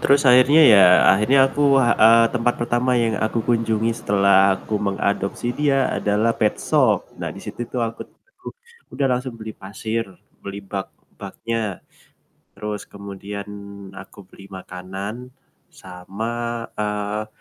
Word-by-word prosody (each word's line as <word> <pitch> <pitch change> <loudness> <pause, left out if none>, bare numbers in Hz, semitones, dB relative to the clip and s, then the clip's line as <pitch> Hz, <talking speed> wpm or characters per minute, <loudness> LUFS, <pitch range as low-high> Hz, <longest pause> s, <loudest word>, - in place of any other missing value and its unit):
Terus 140 +1 +3
akhirnya, 130 +5 +6
ya, 105 -7 +7 0.3
akhirnya 105 +8 +2
aku, 145 - -5 0.2
heeh, 115 -2 +5
tempat 120 -1 0
pertama 120 +1 0
yang 115 -2 0
aku 110 +1 -1
kunjungi 115 -1 0
setelah 100 -3 +3
aku 105 - -6
mengadopsi 100 +3 -2
dia 135 -1 +1
adalah 105 +3 0
petshop, 105 -2 0
nah - - -3
disitu - - -9
tuh 125 - -4
aku 115 0 -7
tuh - - -34 0.8
udah 140 - -2
langsung 125 -1 -4
beli 110 -1 -8
pasir, 110 +4 -5 0.4
beli 100 0 -8
bak 95 0 -5 0.3
baknya, 110 -5 -5 0.7
terus 105 -1 -6
kemudian 100 0 -9 0.5
aku 95 +2 -12
beli 100 - -16
makanan 95 +7 -8 0.4
sama, 95 +4 -8 0.5
eee 105 0 -3
110 Hz, 125 wpm, -21 LUFS, 100-120 Hz, 0.8 s, ya